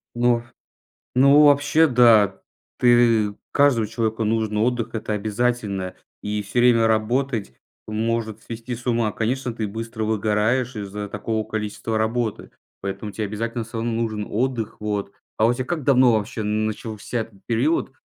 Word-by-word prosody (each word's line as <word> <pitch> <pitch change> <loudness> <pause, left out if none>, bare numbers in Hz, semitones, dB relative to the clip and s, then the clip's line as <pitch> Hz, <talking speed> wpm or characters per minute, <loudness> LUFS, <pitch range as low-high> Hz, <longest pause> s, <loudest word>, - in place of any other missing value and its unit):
Ну, 120 -1 +2 0.7
ну 140 +3 +6
вообще, 145 +3 +4
да. 115 -6 +5 0.4
Ты 115 -4 +4 0.2
каждому 140 -6 +3
человеку 110 0 -1
нужен 110 -1 0
отдых, 120 +1 0
это 110 -1 -3
обязательно. 105 -3 -1 0.3
И 105 0 -2
всё 100 +4 -2
время 115 -2 +5
работать 110 - 0 0.3
может 110 0 -2
свести 115 +2 -6
с 120 - -12
ума. 115 -3 +1
Конечно, 125 +2 -2
ты 110 -2 -3
быстро 110 +1 -5
выгораешь 110 +4 0
из-за 105 0 -5
такого 110 +1 -3
количества 110 +1 -3
работы. 110 0 -2 0.3
Поэтому 100 +2 -5
те 110 - -4
обязательно 115 +3 -3
всё 115 +1 -8
равно 115 +1 -1
нужен 110 -2 -2
отдых. 115 -1 -2
Вот. 105 -2 -2 0.3
А 110 - +3
у 120 - +4
тя 130 - -3
как 155 0 -3
давно 130 -3 +5
вообще 110 +2 -2
начался 110 +2 -3 0.2
период, 130 +9 0
115 Hz, 145 wpm, -23 LUFS, 105-120 Hz, 0.7 s, ну